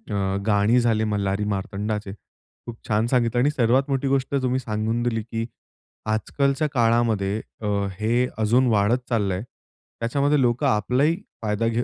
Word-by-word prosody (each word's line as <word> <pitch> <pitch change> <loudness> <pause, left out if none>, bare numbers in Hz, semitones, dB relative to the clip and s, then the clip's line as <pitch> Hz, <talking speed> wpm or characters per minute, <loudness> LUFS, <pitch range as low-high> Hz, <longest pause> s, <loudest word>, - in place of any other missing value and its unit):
अ, 95 0 0
गाणी 105 +3 +4
झाले 115 -2 +2
मल्हारी 100 -1 -1
मार्तंडाचे. 105 +1 -3
खूप 115 +2 -15
छान 110 +2 +1
सांगितलं 120 -1 +1
आणि 145 - +3
सर्वात 130 +1 +2
मोठी 135 0 0
गोष्ट 135 +1 0
तुम्ही 130 +1 +1
सांगून 110 0 -2
दिली, 115 -2 0
की 115 0 -4 0.6
आज 110 0 -2
कालच्या 140 +2 +2
काळामध्ये 115 -4 +1 0.2
अ, 105 - -3 0.3
हे 120 +4 +1
अजून 120 +4 +3
वाढत 110 +2 +3
चाललं 105 -5 +1
आहे. 95 +4 -3 0.6
त्याच्यामध्ये 140 +5 +1
लोकं 120 -1 +2
आपलाही 125 - +2 0.3
फायदा 105 +2 0
घे 115 +1 0
115 Hz, 150 wpm, -23 LUFS, 105-125 Hz, 0.6 s, गाणी